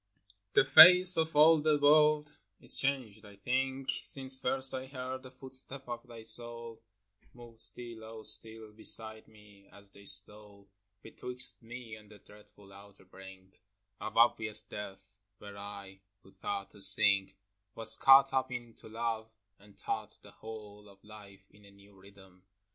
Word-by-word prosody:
'T'HE - - +2
face 180 +6 +6
of 160 -1 -3
all 155 +1 +2
the 155 -1 -1
world 150 0 0 0.2
is - - +3
changed, 125 -6 -6
I 100 -1 -18
think, 130 +5 -6
A - - -12
Since 130 -1 +1
first 130 +1 +2
I 130 0 -9
heard 130 -1 -10
the 130 - -16
footsteps 130 +1 -4
of 120 +1 -11
thy 115 -2 -15
soul 115 0 -2 0.5
Move 120 -2 -14
still, 115 -1 0
oh, 110 0 -14
still, 110 0 +3
beside 110 0 +2
me; 105 -2 -24
as 100 0 -5
they 100 0 -20
stole 105 0 0 0.4
Betwixt 125 +1 -3
me 120 -1 -13
and 105 -1 -22
the 105 - -19
dreadful 105 -1 -23
outer 100 0 -20
brink 95 0 -19 0.4
Of 110 - -10
obvious 115 -2 +1
death, 100 0 -14 0.2
where 100 -1 -15
I 100 -1 -14 0.2
who 95 - -23
thought 100 0 -9
to 105 - -19
sink 100 -1 +3 0.4
Was 115 -1 +5
caught 135 +1 +2
up 130 -1 -4
into 120 -2 -13
love 115 0 -7 0.3
and 100 0 -24
taught - - -9
the - - -18
whole 105 -2 -15
Of 100 0 -25
life 100 -2 -19
in 105 - -25
a 100 - -20
new 100 0 -24
rhythm. 95 -1 -22
110 Hz, 160 wpm, -27 LUFS, 100-130 Hz, 0.5 s, face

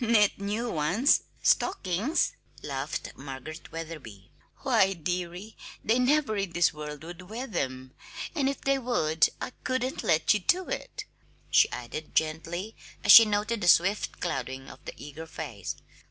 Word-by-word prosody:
"Knit 220 -4 +3
new 210 +4 -2
ones 175 - +3 0.2
stockings!" 270 - +1 0.3
laughed 140 +1 -4
Margaret 135 +3 -9
Wetherby. 155 -12 -8 0.3
"Why, 195 0 +3
dearie, 180 +4 -4 0.3
they 230 +3 +3
never 270 -2 +2
in 195 -3 -2
this 170 0 +3
world 150 0 -7
would 175 +2 -10
wear 235 +4 -4
them 130 - -4 0.4
and 280 -5 +1
if 275 - -4
they 275 0 +1
would, 160 -11 +2
I - - -4
couldn't 255 0 -1
let 160 +5 +3
you 210 - +1
do 360 - +1
it," - - -5 0.5
she - - +6
added 125 +6 -7
gently, 165 +6 -1 0.3
as - - +6
she 230 - +12
noted 210 +2 -1
the 175 - -1
swift 180 +6 +3
clouding 135 -6 -4
of - - -15
the - - -6
eager 150 +3 -9
face. 140 - -6
175 Hz, 150 wpm, -28 LUFS, 155-225 Hz, 0.5 s, she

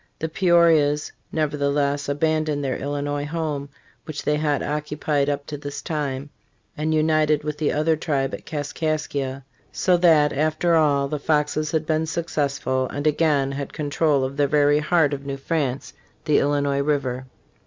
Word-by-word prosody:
The 160 - -3
Peorias, 165 -4 +3 0.2
nevertheless, 145 -2 0
abandoned 155 0 0
their 130 -2 -1
Illinois 145 +1 -3
home, 150 -3 -3 0.4
which 155 -2 -6
they 150 - +1
had 150 -2 0
occu 150 0 -3
pied 145 -2 +1
up 145 0 -2
to 145 - -6
this 145 0 -6
time, 145 -3 -3 0.4
and 155 0 -1
united 155 -1 +2
with 150 0 -4
the 155 - +1
other 155 +2 +2
tribe 140 -4 -1
at, - - -6
Kaskaskia, 145 -3 -3 0.3
so 180 -1 +2
that 160 -4 +4
after 155 +4 +1
all 145 -4 +3
the 150 +1 -3
Foxes 150 +1 0
had 155 0 -1
been 155 +1 0
successful 140 -5 -1
and 145 +1 -4
again 150 -3 +2
had 140 0 -5
control 145 -2 +1
of 135 +2 -4
the 145 -1 +3
very 145 +1 +3
heart 150 -1 +2
of 140 -1 -4
New 140 -1 -4
France, 135 -2 -2 0.3
the 150 -2 +4
Illinois 140 -1 +1
river. 130 -3 -1
150 Hz, 160 wpm, -23 LUFS, 140-155 Hz, 0.4 s, that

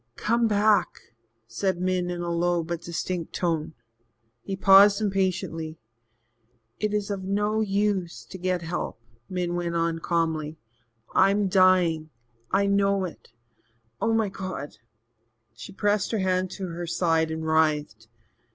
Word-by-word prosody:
"Come 230 - +1
back," 210 0 +2 0.5
said 175 - -2
Min 180 -1 0
in 175 -1 -4
a 170 0 -2
low 170 0 +1
but 170 0 -4
distinct 170 0 -4
tone. 165 -3 -2 0.7
He 195 - -4
paused 195 +1 +7
impatiently. 185 -6 -1 1.0
"It 210 - 0
is 210 -1 -1
of 195 -2 -4
no 210 +3 0
use 200 -4 -1
to 190 - -10
get 180 -1 -1
help," 165 -7 -4 0.3
Min 180 -2 -2
went 175 -1 -2
on 165 0 0
calmly. 160 -2 -1 0.6
"I'm 200 +1 +3
dying 180 -4 +3 0.4
I 200 +1 +2
know 200 -1 +2
it. 175 - -10 0.7
Oh, 225 +2 +2
my 220 -2 +1
God!" 185 -7 -6 0.8
She - - -10
pressed 205 0 0
her - - +2
hand 185 -1 0
to 190 -2 -5
her 170 +1 -5
side 165 -2 +1
and 160 0 -4
writhed. 150 -8 +1
185 Hz, 135 wpm, -26 LUFS, 165-200 Hz, 1.0 s, paused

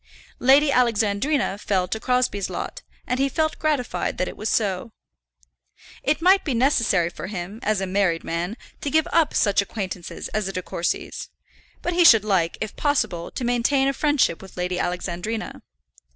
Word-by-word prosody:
Lady 275 +3 +5
Alexandrina 230 0 +1
fell 190 -3 0
to 220 - -3
Crosbie's 250 -6 0
lot, - - -5 0.2
and 250 - -1
he 275 +1 +2
felt 315 +3 -1
gratified 255 - -1
that 185 - 0
it - - -6
was 215 +1 -3
so. 205 0 0 1.1
It 305 +3 0
might 380 +2 +5
be 275 -6 -1
necessary 230 - +2
for 180 - -7
him, 195 +2 -6
as 210 -2 0
a - - 0
married 185 -3 +1
man, 175 +7 -3 0.2
to 285 - -2
give 315 +3 +2
up 330 -3 +3
such 200 -2 +3
acquaintances 190 -4 -5
as 215 -2 -2
the 195 - -4
De 185 - -3
Courcys, 170 - -3 0.5
but 350 - -1
he 350 0 +4
should 225 - +7
like, 185 -5 +1
if 215 -1 -5
possible, 220 - 0
to 250 - -5
maintain 245 +3 +2
a 275 - +1
friendship 290 - +1
with 190 -1 -13
Lady 180 0 -2
Alexandrina. 180 +5 -3
215 Hz, 170 wpm, -23 LUFS, 185-270 Hz, 1.1 s, should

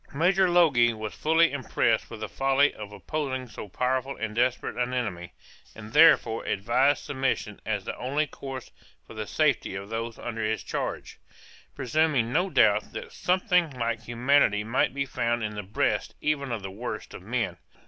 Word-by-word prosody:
Major 185 +4 +3
Logie 140 -10 +4
was 110 -1 -6
fully 160 +2 +3
impressed 140 -4 0
with 115 -2 -9
the 110 - -3
folly 135 +3 +2
of 105 -1 -9
opposing 130 +2 -4
so 105 -2 -9
powerful 130 +5 -1
and 110 -1 -4
desperate 125 +2 0
an 125 +1 -1
enemy, 90 -8 -3 0.4
and 110 0 -10
therefore 135 -8 +5
advised 125 +8 +1
submission 130 -6 -2
as 105 -3 -1
the - - -4
only 140 +5 0
course 135 -4 -8 0.3
for - - -12
the - - -5
safety - - +1
of 100 +1 -6
those 115 0 -4
under 115 -2 -4
his 110 -2 -1
charge; - - -4 0.6
presuming 130 -2 +1
no 185 +2 +2
doubt - - +3
that 485 -2 -7
something 180 - +1
like 115 -1 -1
humanity 120 -2 +2
might 115 +4 +1
be 140 +1 -2
found 120 -3 -1
in 105 -1 -3
the 105 - -4
breasts 100 +2 -1
even 140 -3 -1
of 110 -4 -3
the 95 - -5
worst 115 +6 -6
of - - -9
men. - - -2
125 Hz, 170 wpm, -27 LUFS, 110-145 Hz, 0.6 s, therefore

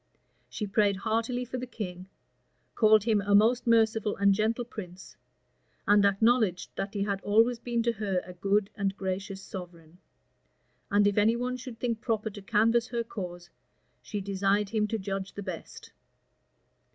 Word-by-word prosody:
She 210 - -4
prayed 205 0 +2
heartily 230 +4 -1
for 255 +1 -5
the 250 - -5
king; 185 -6 -6 0.7
called 215 -2 +5
him 215 -2 +2
a 200 +1 +2
most 235 +4 +4
merciful 225 -2 +3
and 200 0 +4
gentle 225 +4 0
prince; 190 -5 -10 0.7
and 205 0 +5
acknowledged 200 -2 +2
that 195 +2 -4
he 200 - 0
had 200 -1 -2
always 230 +3 +3
been 235 -1 -1
to 235 - +2
her 200 -4 -1
a 180 - -9
good 195 +3 0
and 200 -2 -2
gracious 190 +1 -4
sovereign; 175 -2 -10 0.9
and 205 0 +3
if 205 0 +3
any 220 +3 +4
one 250 +1 -2
should 255 -2 -9
think 230 -3 -2
proper 220 -2 -1
to 205 - -10
canvass 230 +3 +2
her 235 -1 -2
cause, 175 -5 -7 0.5
she 205 - -5
desired 195 +1 0
him 210 -1 0
to 225 - -2
judge 195 -1 -4
the 205 - -6
best. 185 -4 -8
210 Hz, 165 wpm, -28 LUFS, 195-230 Hz, 0.9 s, called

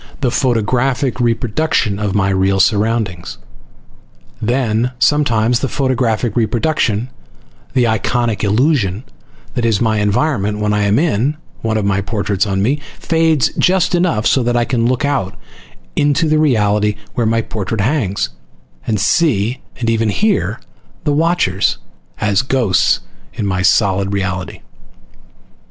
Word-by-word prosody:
the 125 -3 +1
photographic 125 +2 0
reproduction 120 -2 0
of 105 -2 -2
my 100 -1 +2
real 95 0 +1
surroundings. 100 -3 0 1.0
Then, 120 0 0
sometimes, 120 -4 +2
the 135 - -1
photographic 125 -4 0
reproduction, 120 0 0 0.6
the 125 - +4
iconic 115 0 0
illusion, 110 - +1 0.5
that 120 - -2
is 115 -3 +2
my 110 -2 +1
environment 105 0 0
when 105 0 0
I 105 -1 +1
am 100 +2 +2
in 150 -2 +1 0.2
one 110 -1 -1
of 105 - -1
the 100 -1 +1
portraits 100 -1 -1
of 100 -1 -1
me, 125 +10 +1 0.2
fades 160 -4 +2
just 185 0 +2
enough 175 -11 +1
so 130 - +3
that 120 0 0
I 120 - +2
can 115 -2 0
look 130 +3 0
"out" 135 -10 -1 0.6
into 145 +2 +2
the 155 0 +2
reality 105 -7 +2 0.2
where 120 -3 0
my 115 0 +1
portrait 105 0 -3
hangs, 110 -4 0 0.6
and 110 -3 0
see, 120 - +1 0.2
and 120 - -2
even 115 -1 +1
hear 130 - 0 0.4
the 150 -2 +1
watchers, 155 - +1 0.4
as 105 -1 +2
ghosts 130 -7 +1 0.3
in 105 - -3
my 95 -2 -1
solid 100 0 +2
"reality." 95 -2 -3
115 Hz, 135 wpm, -16 LUFS, 105-130 Hz, 1.0 s, the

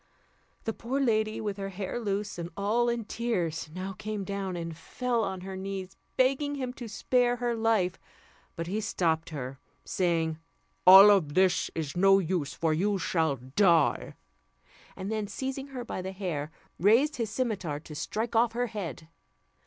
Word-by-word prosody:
The 225 - -2
poor 240 +6 -3
lady, 220 -4 +1
with 205 -2 -3
her 195 0 -4
hair 195 +4 -4
loose, 205 -3 -2
and 170 0 -4
all 225 +4 +2
in 235 -2 -2
tears, 180 -10 -2
now 185 +3 -5
came 210 +1 -4
down, 195 -1 -3
and 165 -1 -5
fell 235 +7 -1
on 190 -2 -3
her 190 +1 -6
knees, 190 0 -5 0.2
begging 275 +3 +2
him 255 -3 -3
to 245 -2 -8
spare 245 +3 +1
her 240 0 -1
life; 220 -6 +1 0.6
but 165 - -3
he 200 +5 -2
stopped 165 -6 0
her, 135 -4 -6 0.3
saying, 165 -3 0 0.5
"All 195 +1 +10
this 175 +5 +2
is 155 -3 -2
of - - -9
no 195 +1 +6
use, 175 -6 -1
for 160 -1 +1
you 200 +5 +1
shall 160 -5 +1
die," 155 - +2 0.8
and 195 +2 -5
then, 215 -2 -1
seizing 265 +6 -4
her 255 -3 -6
by 185 - -4
the 190 +1 -5
hair, 170 -7 -3 0.3
raised 235 - +4
his 230 -3 -1
cimeter 205 - -2
to 155 - -11
strike 220 +9 -3
off 230 0 +4
her 245 +1 0
head. 165 -6 -5
195 Hz, 170 wpm, -29 LUFS, 170-225 Hz, 0.8 s, All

